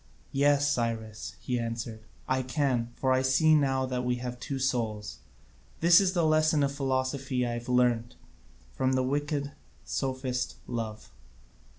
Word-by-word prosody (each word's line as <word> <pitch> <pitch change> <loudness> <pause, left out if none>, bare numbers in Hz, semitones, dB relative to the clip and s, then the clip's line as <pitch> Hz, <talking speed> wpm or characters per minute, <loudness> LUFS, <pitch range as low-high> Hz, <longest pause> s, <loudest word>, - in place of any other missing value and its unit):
"Yes, 145 +1 +3
Cyrus," 115 -4 -3
he 125 -1 -1
answered, 115 -1 -4 0.3
"I 130 0 +1
can; 130 -3 0
for 130 - 0
I 130 - +3
see 130 +4 +4
now 135 -3 +2
that 125 -1 -2
we 125 0 +1
have 125 0 -5
two 140 - -4
souls. 115 -6 -2 0.6
This 170 +3 +7
is 185 -1 +1
the 170 -3 +2
lesson 155 -1 +3
of 140 - +1
philosophy 130 -1 -1
that 120 - -1
I - - -2
have 120 +1 -6
learnt 120 -2 +2 0.6
from 130 0 +1
the 130 0 +2
wicked 145 +1 -1 0.3
sophist 130 -2 -2
Love. 115 -3 -5
130 Hz, 155 wpm, -29 LUFS, 120-140 Hz, 0.6 s, This